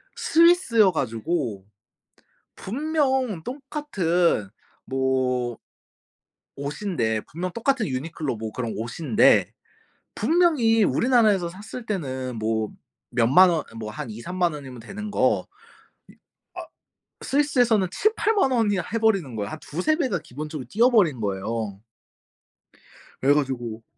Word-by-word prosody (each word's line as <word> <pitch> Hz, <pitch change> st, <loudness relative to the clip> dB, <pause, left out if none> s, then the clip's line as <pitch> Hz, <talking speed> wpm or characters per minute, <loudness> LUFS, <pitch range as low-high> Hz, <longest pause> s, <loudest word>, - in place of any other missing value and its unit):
스위스여 325 Hz, -, +4 dB
가지고 120 Hz, -, -2 dB, 0.9 s
분명 265 Hz, -, -1 dB
똑같은 200 Hz, -, -1 dB, 0.4 s
뭐 130 Hz, -2 st, 0 dB, 1.0 s
옷인데, 140 Hz, -, -2 dB
분명 180 Hz, +3 st, -4 dB
똑같은 240 Hz, -2 st, 0 dB
유니클로 140 Hz, 0 st, -3 dB
뭐 110 Hz, 0 st, -6 dB
그런 120 Hz, -2 st, -4 dB
옷인데 150 Hz, -, +2 dB, 0.6 s
분명히 295 Hz, -11 st, +3 dB
우리나라에서 215 Hz, -8 st, +3 dB
샀을 215 Hz, +6 st, -9 dB
때는 130 Hz, -, -4 dB
뭐 110 Hz, 0 st, -1 dB, 0.5 s
몇 115 Hz, -2 st, +3 dB
만 185 Hz, +7 st, +8 dB
원 160 Hz, -, 0 dB
아 -, -, -16 dB
뭐 110 Hz, -1 st, -6 dB
한 145 Hz, 0 st, -6 dB
20,000-30,000 175 Hz, +9 st, -2 dB
원이면 130 Hz, -4 st, -9 dB
되는 205 Hz, -, -7 dB
거 -, -, +2 dB, 0.7 s
이 -, -, -21 dB, 0.4 s
아 -, -, -5 dB, 0.6 s
스위스에서는 245 Hz, -8 st, +2 dB
70,000-80,000 430 Hz, -, +1 dB
원이나 210 Hz, -6 st, +1 dB
해 230 Hz, -, +1 dB
버리는 195 Hz, -, +1 dB
거야. 100 Hz, 0 st, -3 dB
한 -, -, -6 dB
2-3 180 Hz, -, 0 dB
배가 255 Hz, -, 0 dB
기본적으로 150 Hz, -1 st, -7 dB
뛰어 235 Hz, +4 st, +4 dB
버린 170 Hz, -, +3 dB
거예요. 100 Hz, +1 st, -3 dB, 1.4 s
그래 140 Hz, +2 st, +5 dB
가지고 120 Hz, -6 st, -2 dB
170 Hz, 235 characters per minute, -24 LUFS, -, 1.4 s, 만